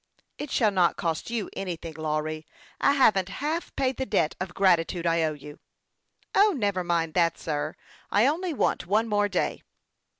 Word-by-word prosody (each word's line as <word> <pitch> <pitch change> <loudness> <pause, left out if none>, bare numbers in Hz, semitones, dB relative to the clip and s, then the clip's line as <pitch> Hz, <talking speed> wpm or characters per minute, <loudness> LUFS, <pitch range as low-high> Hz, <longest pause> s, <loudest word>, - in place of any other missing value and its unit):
" - - -51
It 295 - -5
shall 220 -5 +2
not 180 -3 +2
cost 165 +3 -2
you 230 -4 -2
anything, 170 -4 -5
Lawry. 155 0 -3 0.3
I 280 - +4
haven't 210 -9 +3
half 305 - -3
paid 265 -1 0
the 265 - -2
debt 160 -7 +1
of 185 -1 -5
gratitude 175 -2 +2
I 165 0 +2
owe 155 -1 +1
you." 145 0 -11 0.4
" - - -52 0.3
O, 410 +1 +5
never 200 -5 0
mind 170 -2 0
that, 170 -2 +2
sir! 150 0 -3 0.3
I 210 +3 +4
only 335 +6 0
want 265 - 0
one 215 +4 +2
more 205 -1 +1
day." 180 - -1
185 Hz, 180 wpm, -26 LUFS, 165-230 Hz, 0.4 s, O